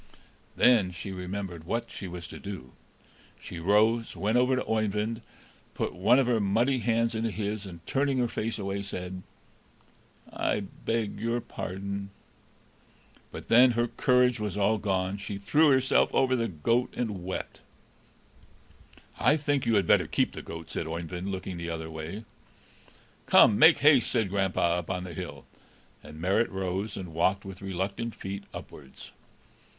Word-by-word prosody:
Then 115 Hz, -7 st, +5 dB
she 90 Hz, +3 st, -7 dB
remembered 90 Hz, -2 st, -5 dB
what 115 Hz, +6 st, -3 dB
she 95 Hz, -, -6 dB
was 85 Hz, -1 st, -7 dB
to -, -, -9 dB
do; 95 Hz, -11 st, -8 dB, 0.7 s
she 85 Hz, -, -8 dB
rose, 110 Hz, +6 st, +2 dB
went 110 Hz, +3 st, 0 dB
over 125 Hz, +1 st, +4 dB
to 130 Hz, -, -2 dB
Oeyvind, 110 Hz, +1 st, -1 dB, 0.5 s
put -, -, -2 dB
one 100 Hz, +8 st, +4 dB
of 135 Hz, -, +3 dB
her 120 Hz, -2 st, +2 dB
muddy 115 Hz, +6 st, +2 dB
hands 115 Hz, 0 st, +1 dB
into 115 Hz, +1 st, -1 dB
his, 105 Hz, -1 st, -4 dB
and, 85 Hz, -3 st, -11 dB
turning 135 Hz, 0 st, 0 dB
her 125 Hz, -1 st, +2 dB
face 115 Hz, 0 st, -3 dB
away, 100 Hz, -1 st, -3 dB
said: 90 Hz, -2 st, -6 dB, 1.1 s
"I 105 Hz, -, 0 dB
beg 110 Hz, +2 st, -3 dB
your 115 Hz, +2 st, 0 dB
pardon!" 100 Hz, -2 st, -5 dB, 1.2 s
But -, -, -9 dB
then 125 Hz, +2 st, +6 dB
her 120 Hz, +1 st, 0 dB
courage 125 Hz, -2 st, +3 dB
was 105 Hz, -1 st, -3 dB
all 105 Hz, +2 st, +2 dB
gone; 95 Hz, -1 st, -1 dB
she 100 Hz, 0 st, -5 dB
threw 150 Hz, +10 st, +3 dB
herself 130 Hz, -1 st, +3 dB
over 130 Hz, -1 st, +3 dB
the 115 Hz, -2 st, 0 dB
goat, 115 Hz, +8 st, 0 dB
and 105 Hz, -7 st, -3 dB
wept. 95 Hz, +1 st, -5 dB, 1.6 s
"I 150 Hz, -, +4 dB
think 145 Hz, -4 st, 0 dB
you 115 Hz, -, +3 dB
had 100 Hz, -, +3 dB
better -, -, +4 dB
keep -, -, +1 dB
the -, -, -7 dB
goat," 80 Hz, 0 st, -9 dB
said 80 Hz, -, -3 dB
Oeyvind, 85 Hz, +3 st, -4 dB
looking 95 Hz, -1 st, -5 dB
the 85 Hz, 0 st, -5 dB
other 80 Hz, -1 st, -5 dB
way. 80 Hz, +8 st, -6 dB, 1.0 s
"Come, 105 Hz, -, +6 dB
make 160 Hz, +1 st, +8 dB
haste!" 145 Hz, -3 st, +5 dB
said 110 Hz, -6 st, +1 dB
grandpapa, 95 Hz, -3 st, +1 dB
up 85 Hz, -, -8 dB
on 90 Hz, -1 st, -2 dB
the 90 Hz, -2 st, -7 dB
hill; -, -, -7 dB, 0.6 s
and 75 Hz, +1 st, -12 dB
Marit 95 Hz, +7 st, +2 dB
rose, 95 Hz, +2 st, -3 dB
and 90 Hz, -4 st, -7 dB
walked 95 Hz, +4 st, +1 dB
with 95 Hz, 0 st, -9 dB
reluctant 100 Hz, +5 st, -3 dB
feet 100 Hz, +1 st, -6 dB
upwards. 70 Hz, -3 st, -11 dB
100 Hz, 160 wpm, -28 LUFS, 95-115 Hz, 1.6 s, make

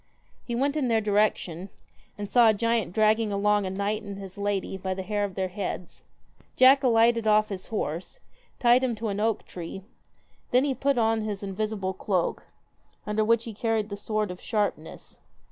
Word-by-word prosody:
He 240 Hz, -, -4 dB
went 280 Hz, +4 st, 0 dB
in 290 Hz, -4 st, 0 dB
their 225 Hz, -2 st, +3 dB
direction, 200 Hz, -4 st, 0 dB, 0.5 s
and 205 Hz, 0 st, -5 dB
saw 235 Hz, +1 st, +5 dB
a 215 Hz, -, +3 dB
giant 230 Hz, -3 st, 0 dB
dragging 215 Hz, +2 st, +2 dB
along 205 Hz, 0 st, +2 dB
a -, -, -2 dB
knight 200 Hz, +3 st, -2 dB
and 200 Hz, -2 st, -7 dB
his 195 Hz, -2 st, -9 dB
lady 200 Hz, -1 st, -2 dB
by 190 Hz, 0 st, -3 dB
the 190 Hz, -, -4 dB
hair 205 Hz, +1 st, -1 dB
of 195 Hz, -3 st, -3 dB
their 190 Hz, -1 st, -1 dB
heads. 185 Hz, -2 st, -5 dB, 0.5 s
Jack 265 Hz, +2 st, +7 dB
alighted 230 Hz, -2 st, +3 dB
off 215 Hz, 0 st, +4 dB
his 190 Hz, -2 st, -6 dB
horse, 185 Hz, -, -4 dB, 0.4 s
tied 245 Hz, +1 st, +4 dB
him 245 Hz, -3 st, 0 dB
to 220 Hz, +1 st, -3 dB
an 200 Hz, 0 st, -3 dB
oak 220 Hz, 0 st, 0 dB
tree, 180 Hz, +2 st, -8 dB, 0.7 s
then 250 Hz, +2 st, +4 dB
he 285 Hz, -2 st, +1 dB
put 275 Hz, 0 st, 0 dB
on 225 Hz, -1 st, +2 dB
his 210 Hz, -2 st, -4 dB
invisible 200 Hz, -1 st, -3 dB
cloak, 190 Hz, -2 st, -2 dB, 0.6 s
under 210 Hz, +1 st, 0 dB
which 230 Hz, +1 st, +2 dB
he 230 Hz, -, -7 dB
carried 220 Hz, 0 st, -1 dB
the 200 Hz, -, -4 dB
sword 210 Hz, -1 st, -2 dB
of 180 Hz, -, -9 dB
sharpness. 205 Hz, -7 st, -3 dB
210 Hz, 185 wpm, -26 LUFS, 195-225 Hz, 0.7 s, Jack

